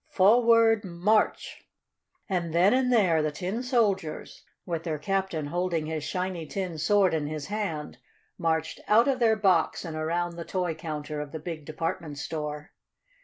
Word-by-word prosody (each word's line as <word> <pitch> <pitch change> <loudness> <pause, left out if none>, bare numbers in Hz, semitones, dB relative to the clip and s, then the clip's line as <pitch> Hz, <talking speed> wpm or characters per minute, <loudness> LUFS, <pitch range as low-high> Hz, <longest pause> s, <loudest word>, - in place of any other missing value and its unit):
Forward 225 +2 +5
march!" 195 +4 0 0.6
And 170 -4 -2
then 185 +6 +5
and 255 -1 +2
there 185 -9 +4
the 155 - 0
tin 190 +9 -3
soldiers, 210 - -1 0.2
with 170 -3 -3
their 165 -2 -3
captain 190 -1 -2
holding 170 0 -1
his 155 -1 -3
shiny 180 0 -3
tin 180 -5 -4
sword 195 +2 +3
in 150 -2 -1
his 150 -1 -5
hand, 170 - -4 0.4
marched 160 -2 -1
out 230 +4 +5
of 265 -2 +1
their 225 -2 +4
box 190 -5 +2
and 160 -2 -5
around 170 +2 -2
the 170 - -4
toy 180 -1 -2
counter 155 -2 -5
of 145 -1 -7
the 160 - -5
big 155 -1 -6
department 165 -1 -4
store. 150 0 -5
175 Hz, 160 wpm, -27 LUFS, 155-200 Hz, 0.6 s, Forward